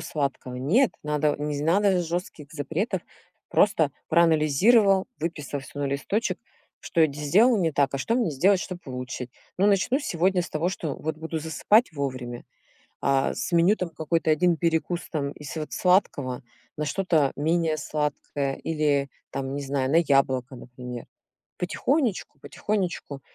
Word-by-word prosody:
сладкого. 135 -4 -3
Нет, 195 - +3
надо 150 0 +1
не 150 0 -2
з - - -3
надо 185 +2 +3
жёстких 170 -2 -5
запретов. 165 - -2 0.5
Просто 165 -8 +3 0.2
проанализировал, 170 - +4
выписал 150 -4 -3
всё 135 +2 -11
на 145 - -1
листочек, 145 +11 -1 0.4
что 170 - -1
я 160 - +7
з 140 - -8
сделал 215 - +4
не 165 -3 +2
так, 140 -1 +1
а 140 - -1
что 225 - 0
мне 235 -9 +1
сделать, 185 +7 +3
чтоб 180 -1 -5
улучшить. 125 -1 -5 0.3
Ну, 195 - +4
начну 205 +6 +3
сегодня 180 - +1
с - - -8
того, 160 +3 0
что 160 -6 -4
вот 160 0 -4
буду 160 0 -4
засыпать 170 +7 +2
вовремя. 130 -4 -4 0.6
А 135 0 +2
с 120 - -4
меню 170 +5 +5
там 180 -5 -3
какой-то 160 0 0
1 170 +2 +3
перекус 170 +1 0
там 140 -3 -2
из 150 +1 -9
вот 155 -1 -5
сладкого 145 -9 +1 0.4
на 150 - -1
что-то 155 -3 +1
менее 160 +1 +1
сладкое 145 -2 -2
или 150 -3 0 0.2
там, 135 0 -4
не 145 - -3
знаю, 135 -1 -1
на 160 - +5
яблоко, 135 -4 +2
например. 125 0 -8 0.5
Потихонечку 230 - -1
потихонечку, 180 -6 -3
155 Hz, 155 wpm, -26 LUFS, 140-180 Hz, 0.6 s, я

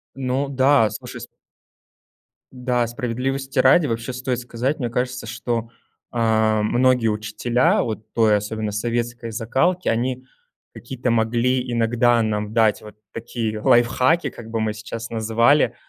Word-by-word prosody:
Ну 135 +1 -1
да, 135 -3 +3
слушай, - - -8
с - - -8 1.2
Да, 125 -2 -1
справедливости 130 +2 -3
ради, 140 +4 +5
вообще, 115 +2 -3
стоит 125 -1 -2
сказать, 125 +4 -3
мне 120 - -2
кажется, 125 0 -3
что, 115 0 -3 0.4
а, 110 -2 +2
многие 125 +1 +2
учителя 110 +4 +1
вот 110 -1 -6
той, 110 -2 +4
особенно 105 +1 -4
советской 120 +1 -3
закалки- 135 +11 0
они 125 +3 -1 0.5
какие-то 130 -3 -4
могли 120 +2 +1
иногда 120 0 +2
нам 105 -1 -2
дать, 110 -2 +3
вот 105 -1 -12 0.2
такие 115 -2 -4
лайфхаки, 130 +6 +3
как 115 -1 -11
бы 115 0 -2
мы 110 -1 -1
сейчас 115 +1 -7
называли. 115 +5 +2
120 Hz, 130 wpm, -22 LUFS, 110-130 Hz, 1.2 s, ради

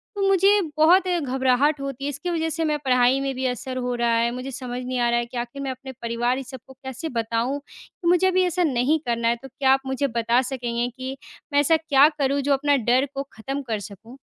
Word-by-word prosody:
तो 400 - -3
मुझे 390 0 +4 0.3
बहुत 360 +4 +5
घबराहट 275 -3 +1
होती 275 -1 -5
है, - - -1
इसकी 290 +5 -4
वजह 325 -1 -1
से 325 +1 -2
मैं 300 -1 +1
पढ़ाई 250 +1 +4
में 270 -1 -2
भी 260 0 -3
असर 255 +1 -4
हो 250 -1 -2
रहा 235 -1 +1
है। 235 +1 +1
मुझे 255 +2 -6
समझ 250 -1 -5
नहीं 255 0 -3
आ 240 0 +2
रहा 240 0 +2
है 240 - -2
कि 245 +1 -9
आखिर 240 +3 -5
मैं 270 -1 -2
अपने 265 +1 -8
परिवार 235 +2 0
इस 265 -2 -7
सबको 260 +1 -11
कैसे 265 +4 -7
बताऊँ 230 +4 -1
कि 345 - -9
मुझे 360 +2 +4
अभी 370 0 +3
ऐसा 360 0 0
नहीं 280 +2 +2
करना 235 -1 0
है। 235 - +3
तो - - -7
क्या 265 +1 +1
आप 270 - +2
मुझे 265 +1 0
बता 235 +2 +2
सकेंगे 245 -2 -2
कि 260 +1 -5 0.4
मैं 285 - +5
ऐसा 320 +3 +4
क्या 295 -3 +5
करूँ 280 +1 +1
जो 280 +1 +2
अपना 285 +1 +2
डर 250 +3 +2
को 275 0 -3
खत्म 270 +6 -5
कर 215 -2 -1
सकूँ? 215 +5 -11
265 Hz, 240 wpm, -23 LUFS, 245-285 Hz, 0.4 s, बहुत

